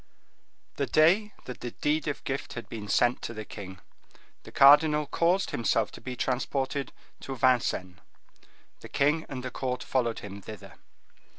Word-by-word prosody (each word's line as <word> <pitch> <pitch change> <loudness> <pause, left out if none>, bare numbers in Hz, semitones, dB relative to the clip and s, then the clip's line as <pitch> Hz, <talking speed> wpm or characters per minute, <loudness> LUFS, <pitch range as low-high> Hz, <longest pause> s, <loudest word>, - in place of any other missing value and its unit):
The - - 0
day 185 +8 +4
that 125 - -7
the 120 - -4
deed 150 +4 -1
of 145 - -3
gift 135 +1 -4
had 115 - -7
been 105 -2 -7
sent 120 +4 +2
to 115 - -6
the 110 0 -6
king, 95 -3 -9 0.6
the - - -13
cardinal 150 +2 +6
caused 175 +6 +1
himself 115 -2 +1
to - - -12
be 125 -1 -5
transported 135 +2 -2 0.3
to 135 - -6
Vincennes. 120 -8 +1 0.8
The - - -11
king 150 +3 +1
and 130 -2 -6
the 130 - -5
court 125 0 -3
followed 120 -3 0
him 100 0 -8
thither. 105 -1 -10
130 Hz, 160 wpm, -28 LUFS, 115-150 Hz, 0.8 s, cardinal